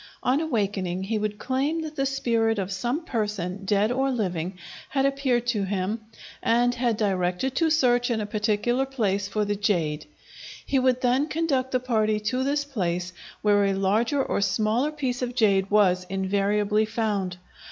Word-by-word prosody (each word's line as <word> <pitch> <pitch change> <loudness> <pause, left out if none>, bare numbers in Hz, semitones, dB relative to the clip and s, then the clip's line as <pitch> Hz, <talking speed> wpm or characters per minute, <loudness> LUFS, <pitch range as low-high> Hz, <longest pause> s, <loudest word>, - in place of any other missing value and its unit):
On 265 +4 +2
awaking 200 - -1
he 215 +2 -1
would 210 0 -2
claim 275 +8 -1
that 310 -1 -7
the 275 -1 0
spirit 230 -4 +1
of 195 -1 -2
some 240 - -2
person, 205 - -3
dead 205 +3 +2
or 265 +2 +1
living, 185 -7 -2 0.3
had 270 0 +1
appeared 270 -3 +1
to 235 -4 0
him 195 +3 -2 0.4
and 240 +1 +3
had 240 -3 0
directed 190 +4 0
to 330 -1 +3
search 245 -5 +3
in 230 -2 0
a 210 - -2
particular 215 +5 0
place 205 -7 -1
for 210 +1 -1
the 205 0 -1
jade. 165 -7 -1 0.6
He 270 - +1
would 255 -1 +2
then 255 +4 +2
conduct 295 -6 0
the 255 - +2
party 220 -4 +1
to 255 +1 0
this 285 +1 0
place, 180 -9 -2 0.3
where 205 -1 +4
a 195 -1 +1
larger 220 +8 +1
or - - -1
smaller 215 +8 +1
piece 260 -5 -3
of 245 -1 -3
jade 195 -5 +3
was 185 -3 +3
invariably 200 +2 +1
found. 210 -5 -2
220 Hz, 170 wpm, -25 LUFS, 200-255 Hz, 0.6 s, where